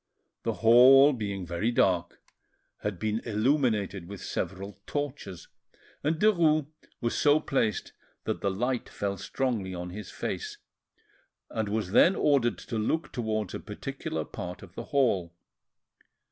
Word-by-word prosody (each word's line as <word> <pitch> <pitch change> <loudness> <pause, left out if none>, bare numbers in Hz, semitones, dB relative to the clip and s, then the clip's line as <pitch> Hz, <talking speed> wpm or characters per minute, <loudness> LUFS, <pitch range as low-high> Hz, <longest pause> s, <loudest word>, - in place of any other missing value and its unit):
The - - -1
hall 135 +5 +8
being 100 -6 -4
very 85 +6 -1
dark, 90 -7 +1 0.6
had 105 -3 -3
been 110 +4 -1
illuminated 110 - 0
with 100 0 -8
several 95 +2 -4
torches, 140 - -4 0.6
and 155 +3 +2
Derues 165 -8 +4 0.4
was 120 - -1
so 145 +1 +4
placed 115 - -1 0.3
that - - -3
the 100 - +1
light 120 +6 -1
fell 100 -1 -3
strongly 100 -3 -2
on 90 0 -5
his 105 +3 -7
face, 420 -1 -4 0.9
and 110 -3 -2
was 105 -3 -2
then 180 - +6
ordered 135 -5 +2
to 115 -3 -4
look 160 +10 -1
towards 110 -5 -2
a - - -4
particular 135 +9 -5
part 90 -3 -7
of 90 -2 -13
the - - -6
hall. 100 -12 +1
110 Hz, 135 wpm, -28 LUFS, 95-135 Hz, 0.9 s, hall